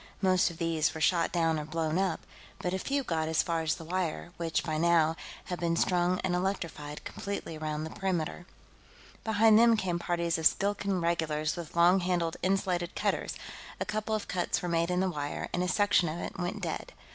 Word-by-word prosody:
Most 185 -2 +3
of 170 - -10
these 165 -1 0
were - - -4
shot 170 +1 +2
down 165 -2 +1
or 150 - -5
blown 160 +1 -1
up, 190 -3 0 0.4
but 180 - -2
a 190 - -1
few 275 +6 -1
got 160 -7 -1
as 160 0 +2
far 165 -1 -1
as 160 0 0
the 165 - -9
wire, 175 0 -2
which, 165 -1 -1
by 155 -2 -2
now, 165 -1 +4 0.3
had 180 - -5
been 170 -1 +1
strung 180 +1 +2
and 185 - -1
electrified 170 -5 -3
completely 200 -5 -5
around 155 0 -3
the 160 - -5
perimeter. 175 -2 -2 0.8
Behind 220 0 +5
them 230 -1 +6
came 180 -4 -1
parties 170 -1 0
of 160 - +7
Skilkan 200 -2 0
regulars 160 -2 0
with 170 -3 -7
long 175 +3 +6
handled 175 -2 0
insulated 185 -2 0
cutters; - - -1 0.4
a - - -1
couple 215 0 -1
of 215 - -4
cuts 180 -1 -1
were - - -1
made 170 0 +1
in 180 0 +1
the 190 -1 +1
wire, 145 -2 -4
and 175 - 0
a 180 - 0
section 185 -3 +3
of 155 - -4
it 185 - -6
went 175 +1 -3
dead. - - -4
175 Hz, 205 wpm, -30 LUFS, 160-185 Hz, 0.8 s, of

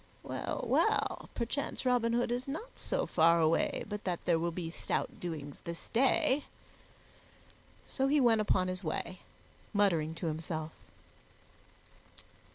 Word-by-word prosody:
Well, - - -3
well, - - +2
perchance 250 +4 -2
Robin 245 -2 +3
Hood 240 0 +1
is 245 +2 -2
not 320 - -5
so - - -1
far 165 0 +4
away 160 0 +2
but 210 0 -5
that 180 -2 -1
there 170 -2 +3
will 170 +1 0
be 165 -1 -4
stout - - -2
doings 150 -5 -5
this 170 0 -7
day." 265 +3 +3 1.4
So 270 -1 0
he 295 +2 +4
went 230 -4 +5
upon 185 -3 +2
his 185 +1 -3
way, 175 +3 -3 0.6
muttering 165 -6 +2
to 170 - -5
himself. 160 0 -3
185 Hz, 135 wpm, -32 LUFS, 165-245 Hz, 1.4 s, went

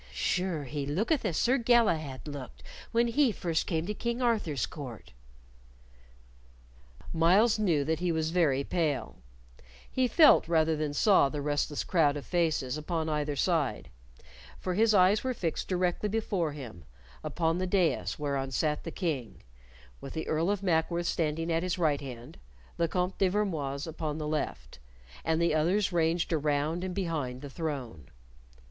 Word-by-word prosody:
"Sure 180 -5 -1
he 140 +1 -4
looketh 215 - 0
as 175 -7 0
Sir 260 +3 +3
Galahad 170 - +2
looked 140 -4 -8 0.3
when 235 +1 +3
he 280 +5 +3
came 230 - 0
first 165 -3 -1
to 170 +4 -1
King 235 +3 -3
Arthur's 215 - 0
court." 130 -7 -9 2.0
Myles 195 +8 +4
knew 170 -9 +2
that 160 +2 -1
he 175 -1 0
was 160 0 -1
very 150 -6 +2
pale; 155 -3 -2 0.7
he 255 -1 +1
felt 300 - +6
rather 160 -1 +2
than 150 -1 -3
saw 190 -6 +5
the 150 - -4
restless 145 0 -1
crowd 150 -5 +2
of 145 - -7
faces 155 -6 0
upon 160 0 -2
either 150 -1 -1
side, 135 - 0 0.7
for 185 - -2
his 220 +3 +3
eyes 190 +3 +4
were 260 -1 -1
fixed 170 -7 -2
directly 180 +2 0
before 195 -7 -1
him, 120 - -9 0.4
upon 165 0 0
the 185 - -1
dais 170 - +1
whereon 140 -2 -2
sat 150 +3 -1
the - - -5
King, 155 - -4 0.6
with 135 - -8
the 160 - -4
Earl 160 +3 +1
of 200 -1 -1
Mackworth 170 -1 +1
standing 165 0 -1
at 165 0 +1
his 180 0 -2
right 155 -5 +1
hand, 125 - -9 0.4
the 170 - +1
Comte 180 +2 -2
de 195 - +4
Vermoise 155 -9 -1
upon 155 -2 -4
the 155 -1 -4
left, 150 - -4 0.4
and 160 0 +1
the 170 -2 +2
others 180 +6 +2
ranged 165 0 +1
around 150 +2 0
and 185 -1 -4
behind 150 -9 -3
the 140 - -7
throne. 135 - -5
165 Hz, 160 wpm, -29 LUFS, 145-185 Hz, 2.0 s, felt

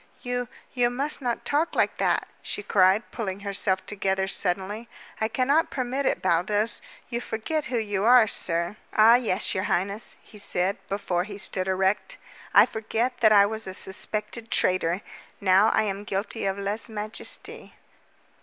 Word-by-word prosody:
"You 245 -1 -2 0.3
you 245 -2 +2
must 280 +5 -2
not 240 -2 -2
talk 305 +4 0
like - - +1
that," - - +1
she 205 - -4
cried, 195 +1 +3
pulling 200 -4 -4
herself 195 -1 0
together 190 -1 -1
suddenly. 200 +4 -2 0.3
"I 220 - +2
cannot 275 +7 +2
permit 260 +1 -2
it, - - 0
Baldos. 195 +5 +1 0.3
You 235 0 -2
forget 280 +8 -3
who 255 -5 -2
you 205 -3 -1
are, 240 0 +7
sir." 170 -1 0 0.2
"Ah, 220 +2 +7
yes, 225 -5 +2
your 190 +1 -1
highness," 200 +5 -2
he 210 - -11
said, 190 -1 +1
before 185 -3 -1
he 200 -1 -8
stood 190 -2 -2
erect. 190 - 0 0.3
"I - - +8
forget 230 +3 -2
that 220 -2 +5
I 200 -1 +7
was 220 +1 -4
a 190 - -4
suspected 215 +4 -3
traitor. 185 -1 +1 0.4
Now 195 +1 +5
I 220 - +2
am 200 -1 -3
guilty 200 +2 -3
of 195 0 -1
_lese 200 +3 -2
majeste." 215 0 -3
210 Hz, 160 wpm, -26 LUFS, 190-235 Hz, 0.4 s, I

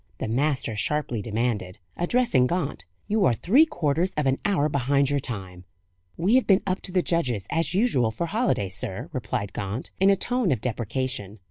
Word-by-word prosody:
the - - -3
master 130 -1 0
sharply 120 +2 -1
demanded, 110 -4 -2 0.2
addressing 175 - +2
Gaunt. 165 - -3 0.2
"You 215 0 +1
are 120 - +3
three 260 - +4
quarters 175 - 0
of 150 - 0
an 135 0 +1
hour 185 -8 +2
behind 140 0 +1
your 145 - +2
time." 95 -8 -6 0.5
"We 185 +7 +2
have 260 - +1
been 195 -1 +4
up 185 0 -1
to 185 - -4
the 180 -1 +2
judges, 125 - 0
as 165 0 0
usual, 190 - +2
for 110 +10 -3
holiday, 195 - 0
sir," 100 - -3
replied 105 -6 -3
Gaunt, 100 +5 -4
in 195 +1 +5
a 200 - +5
tone 245 -2 0
of 125 - +1
deprecation. 115 -2 -3
140 Hz, 180 wpm, -25 LUFS, 115-180 Hz, 0.5 s, in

